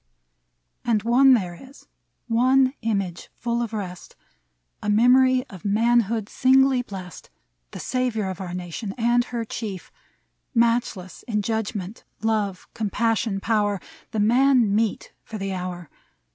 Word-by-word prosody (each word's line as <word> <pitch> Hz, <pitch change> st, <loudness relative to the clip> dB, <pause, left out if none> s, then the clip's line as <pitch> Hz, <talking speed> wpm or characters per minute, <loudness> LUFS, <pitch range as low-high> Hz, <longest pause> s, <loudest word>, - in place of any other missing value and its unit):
And 220 Hz, -3 st, +1 dB
one 255 Hz, +3 st, +6 dB
there 185 Hz, -6 st, -2 dB
is, 270 Hz, -, -15 dB, 0.4 s
one 255 Hz, +3 st, +3 dB
image, 195 Hz, -6 st, -2 dB
full 235 Hz, 0 st, -1 dB
of 235 Hz, -2 st, -3 dB
rest, 185 Hz, -5 st, -6 dB, 0.7 s
A 210 Hz, -, -2 dB
memory 255 Hz, +4 st, +5 dB
of 190 Hz, -7 st, -12 dB
manhood 225 Hz, 0 st, +2 dB
singly 265 Hz, +1 st, +4 dB
blest, 185 Hz, -, -9 dB, 0.4 s
The -, -, -9 dB
savior 245 Hz, -5 st, -1 dB
of 190 Hz, 0 st, -5 dB
our 180 Hz, -1 st, -5 dB
Nation 180 Hz, +3 st, -5 dB
and 240 Hz, +1 st, +2 dB
her 235 Hz, -2 st, -4 dB
Chief: 210 Hz, -5 st, -6 dB, 0.6 s
Matchless 230 Hz, -6 st, 0 dB
in 210 Hz, -3 st, -1 dB
judgment, 220 Hz, -2 st, -3 dB, 0.2 s
love, 210 Hz, -4 st, -1 dB
compassion, 225 Hz, -1 st, 0 dB
power 205 Hz, -2 st, 0 dB, 0.2 s
— -, -, -25 dB
The 220 Hz, -, -2 dB
Man 240 Hz, 0 st, +4 dB
meet 220 Hz, 0 st, -1 dB
for 220 Hz, -, -7 dB
the 195 Hz, -1 st, -3 dB
hour. 180 Hz, -2 st, -5 dB
220 Hz, 130 wpm, -24 LUFS, 195-240 Hz, 0.7 s, one